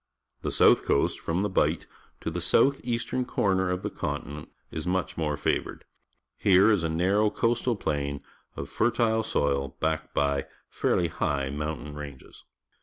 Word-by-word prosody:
The -, -, -2 dB
south -, -, +5 dB
coast, 70 Hz, -, +1 dB
from 85 Hz, +4 st, -1 dB
the -, -, +1 dB
Bight -, -, 0 dB, 0.4 s
to 80 Hz, -, -3 dB
the 90 Hz, +2 st, -3 dB
south 130 Hz, +11 st, +3 dB
eastern 120 Hz, +1 st, -1 dB
corner 95 Hz, -6 st, +1 dB
of 90 Hz, +1 st, -2 dB
the -, -, -2 dB
continent, 75 Hz, +2 st, -5 dB, 0.2 s
is 80 Hz, +2 st, -5 dB
much 90 Hz, 0 st, -1 dB
more 75 Hz, -3 st, -1 dB
favoured. -, -, -2 dB, 0.5 s
Here 100 Hz, +2 st, +5 dB
is 100 Hz, -6 st, +2 dB
a 80 Hz, -, 0 dB
narrow 95 Hz, +6 st, +2 dB
coast 115 Hz, +3 st, 0 dB
al 120 Hz, -, +3 dB
plain 70 Hz, -6 st, -2 dB, 0.3 s
of -, -, -5 dB
fertile 110 Hz, -1 st, +1 dB
soil, 70 Hz, -10 st, -1 dB
backed 80 Hz, 0 st, -2 dB
by 70 Hz, -1 st, +1 dB, 0.2 s
fairly 85 Hz, -2 st, +1 dB
high 70 Hz, -3 st, -1 dB
mountain 75 Hz, 0 st, -4 dB
ranges. 75 Hz, -2 st, -10 dB
85 Hz, 160 wpm, -27 LUFS, 75-105 Hz, 0.5 s, south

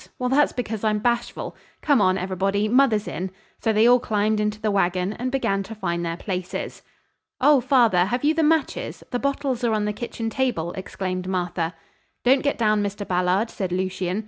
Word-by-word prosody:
Well, 250 Hz, 0 st, -1 dB
that's 290 Hz, +3 st, +3 dB
because 225 Hz, -4 st, -4 dB
I'm 215 Hz, -1 st, +2 dB
bashful. 235 Hz, +3 st, -2 dB, 0.3 s
Come 285 Hz, -7 st, +4 dB
on, 185 Hz, -1 st, +3 dB
everybody, 195 Hz, +2 st, 0 dB
mother's 235 Hz, -3 st, +3 dB
in." 185 Hz, +2 st, -4 dB, 0.3 s
So 225 Hz, -, +1 dB
they 215 Hz, +1 st, +4 dB
all 245 Hz, +1 st, +6 dB
climbed 215 Hz, -1 st, 0 dB
into 210 Hz, 0 st, -1 dB
the 215 Hz, -1 st, 0 dB
wagon 185 Hz, 0 st, +1 dB
and 255 Hz, +3 st, -3 dB
began 200 Hz, -7 st, 0 dB
to 220 Hz, +3 st, -8 dB
find 170 Hz, -4 st, -2 dB
their 165 Hz, 0 st, -3 dB
places. 185 Hz, -2 st, -4 dB, 0.6 s
"Oh, 285 Hz, 0 st, +5 dB
father, 230 Hz, -9 st, +4 dB
have 245 Hz, +6 st, -2 dB
you 300 Hz, +2 st, +4 dB
the 325 Hz, -, +1 dB
matches? 315 Hz, -1 st, 0 dB
The 245 Hz, -, -1 dB
bottles 275 Hz, -2 st, -1 dB
are 235 Hz, -2 st, +2 dB
on 210 Hz, -1 st, 0 dB
the 210 Hz, -, -1 dB
kitchen 230 Hz, -1 st, -4 dB
table," 240 Hz, -11 st, -1 dB
exclaimed 185 Hz, -1 st, -4 dB
Martha. 175 Hz, -2 st, -2 dB, 0.5 s
"Don't 265 Hz, +2 st, +4 dB
get 285 Hz, -, 0 dB
down, 215 Hz, -2 st, +2 dB
Mr. 205 Hz, 0 st, -4 dB
Ballard," 180 Hz, +5 st, +1 dB
said 190 Hz, -3 st, -3 dB
Lucien. 185 Hz, +1 st, -1 dB
210 Hz, 190 wpm, -23 LUFS, 185-245 Hz, 0.6 s, all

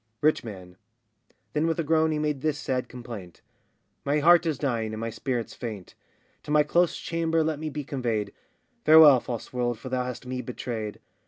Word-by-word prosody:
RICH 155 Hz, +1 st, +3 dB
MAN. 95 Hz, -5 st, -9 dB, 0.8 s
[Then 155 Hz, +2 st, +1 dB
with 165 Hz, +1 st, -1 dB
a -, -, +1 dB
groan 160 Hz, +1 st, +2 dB
he 155 Hz, -, 0 dB
made 150 Hz, -3 st, -1 dB
this 155 Hz, -1 st, 0 dB
sad 125 Hz, -3 st, -2 dB
complaint]: 115 Hz, -8 st, -9 dB, 0.6 s
My 145 Hz, +2 st, +1 dB
heart 170 Hz, +3 st, +5 dB
is 155 Hz, -4 st, 0 dB
dying, 115 Hz, -6 st, -1 dB
and -, -, -6 dB
my 115 Hz, 0 st, -3 dB
spirits 120 Hz, 0 st, -3 dB
faint; 105 Hz, -6 st, -7 dB, 0.5 s
To -, -, -13 dB
my 150 Hz, 0 st, +5 dB
close 170 Hz, +3 st, +2 dB
chamber 165 Hz, -1 st, 0 dB
let 155 Hz, -2 st, -1 dB
me 155 Hz, 0 st, -3 dB
be 150 Hz, 0 st, -5 dB
conveyed; 120 Hz, -7 st, -2 dB, 0.5 s
Farewell, 155 Hz, -4 st, +8 dB
false 120 Hz, 0 st, -6 dB
world, 120 Hz, -2 st, -1 dB
for 130 Hz, +4 st, -8 dB
thou 125 Hz, -1 st, -1 dB
hast 125 Hz, -1 st, -6 dB
me 125 Hz, 0 st, -3 dB
betrayed. 115 Hz, -3 st, -5 dB
130 Hz, 185 wpm, -26 LUFS, 115-155 Hz, 0.8 s, Farewell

